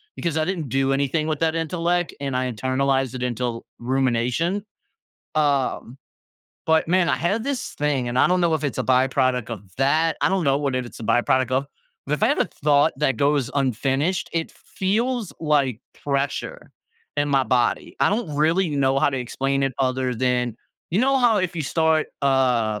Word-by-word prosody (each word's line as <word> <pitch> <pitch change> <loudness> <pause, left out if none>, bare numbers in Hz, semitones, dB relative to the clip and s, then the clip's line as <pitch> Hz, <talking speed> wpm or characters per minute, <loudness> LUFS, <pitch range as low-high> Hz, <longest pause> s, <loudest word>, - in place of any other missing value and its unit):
because 165 -2 -2
I 155 - +1
didn't 170 -8 -3
do 135 +2 +1
anything 140 +3 0
with 155 -2 -1
that 165 0 +1
intellect 170 +2 -1
and 135 -2 -2
I 130 0 -1
internalized 130 +2 0
it 125 - -4
until 120 -1 -3
rumination. 130 - 0 0.7
Um, 140 -4 0 0.7
but 160 0 +3
man, 180 -1 +3
I - - +2
had 200 +7 0
this 275 -3 -3
thing 145 -4 -1
and 120 - -3
I - - +5
don't 180 0 +2
know 170 -2 +2
if 155 - -2
it's 140 - -2
a - - +1
byproduct 130 -2 +1
of 110 -4 -5
that. 155 +4 +2
I - - +3
don't 190 -3 0
know 135 0 +3
what 140 -3 -1
it's 125 -4 -4
a - - -7
byproduct 130 +3 +2
of, 135 +2 0 0.4
but 145 - -3
if 150 - -6
I - - +5
had - - +1
a - - +3 0.2
thought 145 -1 +4
that 135 -4 +1
goes 140 -3 +1
unfinished, 135 - 0
it 165 -1 -2
feels 225 +3 -2
like 140 -6 +1 0.2
pressure 140 0 -3 0.5
in 145 0 +1
my 135 -2 +3
body. 120 -2 0
I - - +4
don't 200 -8 -2
really 165 +3 +2
know 135 -1 +2
how 140 - +3
to 135 - -2
explain 135 +3 -1
it 135 - 0
other 130 -1 0
than 125 -1 0 0.3
you 185 - +2
know, 270 +1 +3
how 240 -3 +4
if 185 -1 -1
you 155 - -1
start, 160 +2 +1 0.2
uh, 125 -6 +2
140 Hz, 190 wpm, -23 LUFS, 130-165 Hz, 0.7 s, I